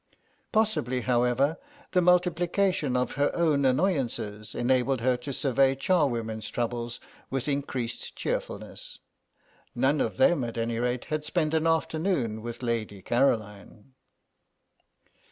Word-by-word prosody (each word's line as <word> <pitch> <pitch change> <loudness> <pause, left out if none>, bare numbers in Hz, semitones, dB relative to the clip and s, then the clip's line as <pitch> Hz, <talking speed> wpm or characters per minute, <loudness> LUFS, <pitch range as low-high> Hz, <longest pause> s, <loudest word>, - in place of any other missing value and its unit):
Possibly, 210 - +1
however, 125 +5 +2 0.3
the 180 - +3
multiplication 180 -4 +2
of 125 -1 0
her 145 +1 +1
own 155 -5 +2
annoyances 130 - 0
enabled 130 0 +1
her 125 +1 +3
to 125 +3 -6
survey 135 0 +2
charwomen's 120 - 0
troubles 120 0 -3 0.3
with 135 0 -2
increased 135 -4 -3
cheerfulness. - - -4 0.8
None 135 +4 +2
of 105 -4 -2
them, 140 0 +4
at 115 0 -5
any 115 0 -1
rate, 125 0 -1
had 155 -1 -2
spent 155 0 0
an 160 0 +2
afternoon 160 - 0
with 120 +2 -7
Lady 110 -5 -2
Caroline. 110 -1 -1
130 Hz, 120 wpm, -27 LUFS, 120-155 Hz, 0.8 s, them